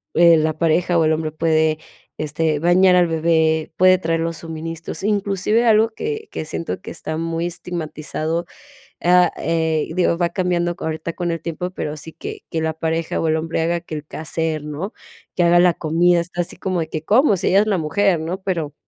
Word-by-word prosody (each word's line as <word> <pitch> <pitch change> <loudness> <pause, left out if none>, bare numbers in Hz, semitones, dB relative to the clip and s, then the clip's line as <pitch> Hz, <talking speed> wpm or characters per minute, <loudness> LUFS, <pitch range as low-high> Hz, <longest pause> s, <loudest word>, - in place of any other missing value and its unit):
eh, 170 0 +7
la 155 0 +1
pareja 170 +2 +2
o - - +3
el 155 - +3
hombre 155 0 -2
puede, 155 -1 +2 0.4
este, 155 0 -1
bañar 180 +2 +5
al 175 -1 +4
bebé, 160 -1 +1
puede 185 0 +6
traer 165 -2 -1
los 165 0 -2
suministros, 165 +1 -6
inclusive 205 +2 +1
algo 220 0 +5
que 435 - -5
que 155 - -4
siento 165 - -4
que - - -8
está 155 -1 -5
muy 165 +1 -2
estigmatizado, 165 -1 -4 0.6
ah, 180 0 +5
eh, 160 -1 0
y - - -8
digo, 175 -2 +2
va 175 0 +2
cambiando 175 -1 0
ahorita 160 +1 -4
con 175 0 -2
el 165 - -3
tiempo, 170 +2 -4
pero 150 -4 -4
sí 160 +2 -8
que 425 0 -8
que 160 - -1
la 160 0 -1
pareja 160 0 -2
o 165 - 0
el 160 - +2
hombre 160 0 -2
haga 170 +1 0
que 155 - -7
el 150 - -5
quehacer, 160 0 -3
¿no?, 150 +7 -5 0.4
que 180 - +2
haga 175 0 +5
la 175 -1 +5
comida. 170 +3 +2
Está 175 +1 -3
así 170 - -6
como 185 -2 -1
de 160 - -4
que, 155 0 -5
¿cómo?, 220 - +4
si - - -1
ella 195 +2 +5
es 215 - -1
la 205 -3 +2
mujer, 170 +3 +1
¿no?, 170 +5 -4
pero 165 -7 -2
165 Hz, 205 wpm, -20 LUFS, 160-180 Hz, 0.6 s, eh